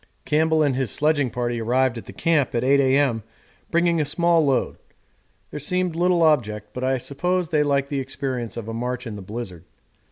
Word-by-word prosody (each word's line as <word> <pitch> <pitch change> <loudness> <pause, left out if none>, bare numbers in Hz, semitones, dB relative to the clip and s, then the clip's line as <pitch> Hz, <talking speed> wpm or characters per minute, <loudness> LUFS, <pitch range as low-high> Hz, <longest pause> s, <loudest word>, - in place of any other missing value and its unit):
Campbell 160 +1 +2
and 140 -3 +1
his 130 -3 -1
sledging 145 +1 +1
party 120 -1 -2
arrived 125 +2 +1
at 115 - -8
the - - -8
Camp 155 -7 +1
at 120 - +1
8.0 140 +2 +4
A.M. 135 -3 +2 0.5
bringing 170 -1 +2
a - - +2
small 170 +3 +2
load: 135 -3 0 0.7
there - - -5
seemed 180 +3 -1
little 175 0 +2
object, 105 -9 +1
but 125 - -5
I 130 0 +1
suppose 175 +7 -1
they 155 -3 +2
like 140 -1 +1
the 140 - -1
experience 130 -3 -4
of 115 -2 -6
a 115 - -4
march 125 +2 -3
in 110 -3 -6
the 100 - -7
blizzard. 95 -4 -7
135 Hz, 195 wpm, -23 LUFS, 120-155 Hz, 0.7 s, 8.0